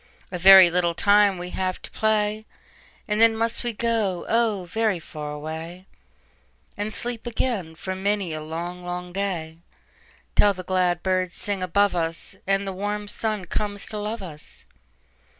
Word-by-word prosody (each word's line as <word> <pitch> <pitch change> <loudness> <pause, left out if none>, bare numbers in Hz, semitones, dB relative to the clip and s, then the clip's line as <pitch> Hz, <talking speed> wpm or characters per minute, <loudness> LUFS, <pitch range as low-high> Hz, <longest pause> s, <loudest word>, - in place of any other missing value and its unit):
"A 180 - -4
very 190 -1 +9
little 170 -1 +1
time 205 0 +4
we 180 +1 -6
have 185 -1 -2
to - - -10
play, 215 0 0 0.6
Then 225 +1 +4
must 230 +2 +1
we 240 - -1
go, 220 -5 -1
oh, 220 -5 +1
very 215 +2 0
far 150 -2 -7
away, 160 +4 -7 0.9
And 205 +1 -3
sleep 240 +1 -3
again 220 -9 -2
for 185 +3 -5
many 195 -2 -1
a 155 - -4
long, 170 +3 -5
long 180 0 -5
day, 170 -5 -3 0.8
Till 205 -1 +5
the 185 - -7
glad 180 -1 +1
birds 185 -2 0
sing 200 -2 -3
above 200 +2 +2
us, 165 -1 -3
And 195 0 +1
the 195 - -3
warm 205 +2 -3
sun 215 -2 -2
comes 205 0 -3
to 210 - -4
love 210 0 -4
us. 155 -4 -10
190 Hz, 155 wpm, -24 LUFS, 175-210 Hz, 0.9 s, very